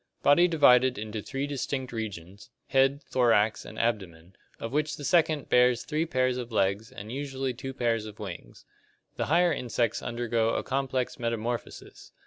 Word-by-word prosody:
Body 160 Hz, +5 st, +6 dB
divided 130 Hz, -6 st, +5 dB
into 105 Hz, 0 st, -5 dB
three 135 Hz, +6 st, -3 dB
distinct 135 Hz, -2 st, -3 dB
regions: 100 Hz, -3 st, -7 dB, 0.2 s
head, 135 Hz, +2 st, +3 dB
thorax, 115 Hz, -4 st, +2 dB
and 110 Hz, -, -10 dB
abdomen, 95 Hz, -7 st, -3 dB, 0.2 s
of 115 Hz, -, -5 dB
which 150 Hz, +2 st, -1 dB
the 145 Hz, -, -8 dB
second 155 Hz, -2 st, +2 dB
bears 125 Hz, -1 st, +4 dB
three 155 Hz, +2 st, -1 dB
pairs 130 Hz, -3 st, +1 dB
of 120 Hz, -1 st, -6 dB
legs 100 Hz, +1 st, 0 dB
and 105 Hz, +2 st, -9 dB
usually 135 Hz, -1 st, -3 dB
two 135 Hz, +2 st, -6 dB
pairs 115 Hz, -4 st, -1 dB
of 105 Hz, -1 st, -10 dB
wings. 95 Hz, -5 st, -9 dB, 0.5 s
The -, -, -1 dB
higher 170 Hz, +2 st, +3 dB
insects 120 Hz, -2 st, -1 dB
undergo 115 Hz, -1 st, 0 dB
a -, -, -1 dB
complex 130 Hz, -1 st, -2 dB
metamorphosis. 115 Hz, 0 st, -4 dB
125 Hz, 155 wpm, -28 LUFS, 110-135 Hz, 0.5 s, Body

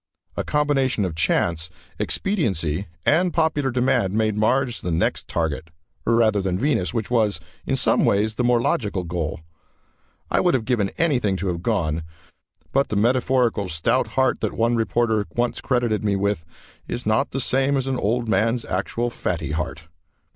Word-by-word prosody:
A -, -, -1 dB
combination 135 Hz, -7 st, +1 dB
of 90 Hz, -, -3 dB
chance, 85 Hz, +1 st, +1 dB, 0.3 s
expediency 100 Hz, -, 0 dB, 0.2 s
and 175 Hz, +4 st, +3 dB
popular 160 Hz, -5 st, +1 dB
demand 120 Hz, -6 st, +1 dB
made 110 Hz, -1 st, +1 dB
Mars 120 Hz, +3 st, +1 dB
the 90 Hz, -, -3 dB
next 85 Hz, 0 st, 0 dB
target, 80 Hz, -1 st, -2 dB, 0.4 s
rather 110 Hz, -3 st, +3 dB
than 95 Hz, -2 st, -1 dB
Venus, 125 Hz, -7 st, +1 dB
which 115 Hz, -1 st, -3 dB
was, 110 Hz, -4 st, +2 dB, 0.3 s
in -, -, +1 dB
some -, -, +3 dB
ways, 105 Hz, +2 st, +2 dB
the 125 Hz, -, -1 dB
more 120 Hz, 0 st, +3 dB
logical 105 Hz, -5 st, 0 dB
goal. 85 Hz, -2 st, -3 dB, 0.9 s
I -, -, +3 dB
would 175 Hz, -, +3 dB
have 115 Hz, -4 st, -1 dB
given 110 Hz, -6 st, +1 dB
anything 125 Hz, -, +1 dB
to 95 Hz, 0 st, -2 dB
have 85 Hz, -1 st, -3 dB
gone, 85 Hz, -7 st, 0 dB, 0.7 s
but 135 Hz, +1 st, +2 dB
the -, -, -2 dB
metaphorical 120 Hz, -2 st, +2 dB
stout 115 Hz, +11 st, +1 dB
heart 130 Hz, -1 st, +3 dB
that -, -, -1 dB
one 115 Hz, +1 st, +1 dB
reporter 115 Hz, -2 st, +1 dB
once 120 Hz, 0 st, 0 dB
credited 120 Hz, -5 st, 0 dB
me 100 Hz, -2 st, +1 dB
with 100 Hz, -4 st, -1 dB, 0.4 s
is 120 Hz, -, -4 dB
not 110 Hz, +6 st, +2 dB
the 135 Hz, -, -3 dB
same 135 Hz, +2 st, +1 dB
as 130 Hz, -, -1 dB
an 135 Hz, -1 st, -1 dB
old 115 Hz, +3 st, 0 dB
man's 115 Hz, +2 st, +1 dB
actual 115 Hz, +6 st, -2 dB
fatty 80 Hz, -, -3 dB
heart. 75 Hz, 0 st, -3 dB
110 Hz, 165 wpm, -23 LUFS, 95-125 Hz, 0.9 s, and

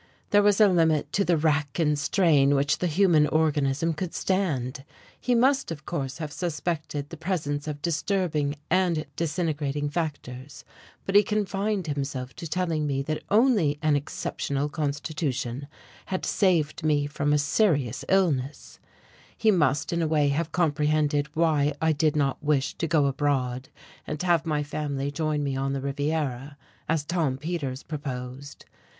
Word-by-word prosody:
There 205 Hz, -, +6 dB
was 205 Hz, 0 st, +3 dB
a 215 Hz, -, +7 dB
limit 165 Hz, -5 st, +2 dB
to 200 Hz, -, +2 dB
the 175 Hz, -3 st, +2 dB
wrack 150 Hz, -2 st, 0 dB
and 150 Hz, -3 st, +2 dB
strain 145 Hz, -3 st, +3 dB
which 140 Hz, +2 st, +1 dB
the 180 Hz, -, 0 dB
human 165 Hz, -3 st, +4 dB
organism 150 Hz, 0 st, +1 dB
could 170 Hz, +1 st, -5 dB
stand. 145 Hz, -9 st, -1 dB, 0.4 s
He 250 Hz, -, +1 dB
must 265 Hz, +3 st, +3 dB
of 150 Hz, -3 st, -7 dB
course 140 Hz, -6 st, -3 dB
have 155 Hz, -3 st, -5 dB
suspected 155 Hz, -3 st, -3 dB
the 165 Hz, -, -8 dB
presence 155 Hz, -4 st, -2 dB
of 145 Hz, -1 st, -5 dB
disturbing 165 Hz, -4 st, 0 dB
and 175 Hz, -3 st, +1 dB
disintegrating 150 Hz, -3 st, -1 dB
factors, 145 Hz, -5 st, -5 dB, 0.4 s
but 195 Hz, -, -2 dB
he 205 Hz, -, +8 dB
confined 205 Hz, -1 st, -1 dB
himself 135 Hz, -3 st, -4 dB
to 170 Hz, -, -5 dB
telling 165 Hz, -3 st, -1 dB
me 135 Hz, -1 st, -1 dB
that 155 Hz, +2 st, -3 dB
only 210 Hz, -, +3 dB
an 155 Hz, -1 st, +3 dB
exceptional 145 Hz, 0 st, -2 dB
constitution 145 Hz, -3 st, -3 dB, 0.4 s
had 185 Hz, -1 st, -2 dB
saved 170 Hz, -6 st, +1 dB
me 150 Hz, -2 st, +2 dB
from 145 Hz, 0 st, -1 dB
a 150 Hz, -, +4 dB
serious 145 Hz, -, +1 dB
illness; 155 Hz, -8 st, 0 dB, 0.6 s
he 220 Hz, -, +4 dB
must 150 Hz, -5 st, +1 dB
in 170 Hz, -, 0 dB
a 160 Hz, -, +1 dB
way 150 Hz, -2 st, +2 dB
have 155 Hz, +3 st, -1 dB
comprehended 150 Hz, -2 st, +1 dB
why 155 Hz, -3 st, +2 dB
I 160 Hz, 0 st, +2 dB
did 155 Hz, 0 st, +1 dB
not 140 Hz, -2 st, 0 dB
wish 145 Hz, -3 st, +1 dB
to 165 Hz, -, 0 dB
go 155 Hz, -3 st, +3 dB
abroad, 135 Hz, -2 st, -1 dB, 0.4 s
and 150 Hz, -, -4 dB
have 170 Hz, -2 st, +2 dB
my 150 Hz, -2 st, 0 dB
family 145 Hz, -1 st, -3 dB
join 150 Hz, 0 st, -1 dB
me 140 Hz, -1 st, -1 dB
on 135 Hz, +1 st, -1 dB
the 135 Hz, -, -2 dB
Riviera, 140 Hz, -1 st, -2 dB, 0.3 s
as 155 Hz, -2 st, 0 dB
Tom 160 Hz, -6 st, 0 dB
Peters 145 Hz, -3 st, -4 dB
proposed. 135 Hz, -2 st, -7 dB
150 Hz, 155 wpm, -26 LUFS, 140-170 Hz, 0.6 s, he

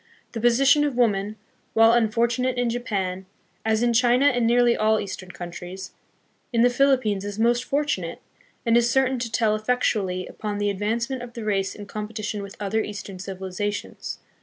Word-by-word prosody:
The 225 Hz, -, -5 dB
position 270 Hz, +5 st, +5 dB
of 285 Hz, -4 st, -1 dB
woman, 210 Hz, -3 st, +1 dB, 0.4 s
while 225 Hz, 0 st, +7 dB
unfortunate 235 Hz, +2 st, +1 dB
in 245 Hz, -1 st, +1 dB
Japan, 195 Hz, -6 st, -3 dB, 0.4 s
as 220 Hz, +1 st, +1 dB
in 240 Hz, -1 st, +2 dB
China 245 Hz, +3 st, +4 dB
and 245 Hz, -5 st, +3 dB
nearly 240 Hz, 0 st, +4 dB
all 220 Hz, 0 st, +2 dB
eastern 190 Hz, -2 st, -6 dB
countries, 180 Hz, +1 st, -8 dB, 0.6 s
in 230 Hz, -2 st, +2 dB
the 245 Hz, -, +5 dB
Philippines 250 Hz, -7 st, +2 dB
is 205 Hz, 0 st, -5 dB
most 240 Hz, +2 st, +2 dB
fortunate, 275 Hz, -, -1 dB, 0.5 s
and 230 Hz, 0 st, +3 dB
is 240 Hz, 0 st, +4 dB
certain 265 Hz, 0 st, +2 dB
to 235 Hz, -2 st, -4 dB
tell 220 Hz, -2 st, +2 dB
effectually 215 Hz, -5 st, 0 dB
upon 210 Hz, -1 st, -5 dB
the 205 Hz, 0 st, 0 dB
advancement 230 Hz, +6 st, -2 dB
of 245 Hz, -1 st, -9 dB
the 230 Hz, -, -6 dB
race 195 Hz, -2 st, 0 dB
in 205 Hz, -, -8 dB
competi 215 Hz, +1 st, -6 dB
tion 210 Hz, 0 st, -3 dB
with 200 Hz, 0 st, -9 dB
other 210 Hz, +2 st, 0 dB
eastern 200 Hz, -3 st, -7 dB
civilizations. 195 Hz, +2 st, -5 dB
220 Hz, 170 wpm, -24 LUFS, 200-240 Hz, 0.6 s, while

